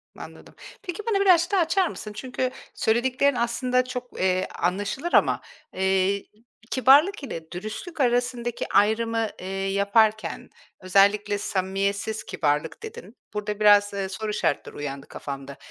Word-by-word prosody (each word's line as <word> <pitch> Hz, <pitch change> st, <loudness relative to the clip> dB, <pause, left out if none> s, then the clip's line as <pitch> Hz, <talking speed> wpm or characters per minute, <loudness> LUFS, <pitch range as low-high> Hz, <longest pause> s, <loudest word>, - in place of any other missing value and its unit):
Anladım. -, -, -12 dB, 0.3 s
Peki, 380 Hz, +1 st, -6 dB
bunu 400 Hz, -, +2 dB
birazcık 360 Hz, -1 st, +4 dB
daha 390 Hz, -, +3 dB
açar 345 Hz, +2 st, +2 dB
mısın? 210 Hz, -, -7 dB
Çünkü 255 Hz, +3 st, -3 dB, 0.2 s
söylediklerin 255 Hz, +4 st, +2 dB
aslında 250 Hz, +2 st, +1 dB
çok, 250 Hz, -1 st, -7 dB
eee, 185 Hz, 0 st, +1 dB
anlaşılır 205 Hz, -, -2 dB
ama, -, -, +4 dB, 0.3 s
eee, 190 Hz, +1 st, +1 dB
k -, -, -33 dB, 0.4 s
kibarlık 285 Hz, -, +5 dB
ile 165 Hz, -11 st, -7 dB
dürüstlük 215 Hz, -, -6 dB
arasındaki 240 Hz, -1 st, 0 dB
ayrımı, 225 Hz, +2 st, +2 dB
ııı, 185 Hz, -, -6 dB
yaparken, 200 Hz, +3 st, +1 dB, 0.3 s
özellikle 200 Hz, +2 st, +3 dB
"samimiyetsiz 200 Hz, +2 st, -2 dB
kibarlık" 150 Hz, -, -1 dB
dedin. 445 Hz, -, -9 dB, 0.2 s
Burada 210 Hz, 0 st, -3 dB
biraz, 205 Hz, -1 st, +5 dB
eee, 195 Hz, -1 st, -3 dB
soru 215 Hz, +2 st, -4 dB
işaretleri 145 Hz, -, -1 dB
uyandı 140 Hz, -1 st, -6 dB
kafamda. 140 Hz, -1 st, -7 dB
215 Hz, 130 wpm, -25 LUFS, 195-255 Hz, 0.4 s, kibarlık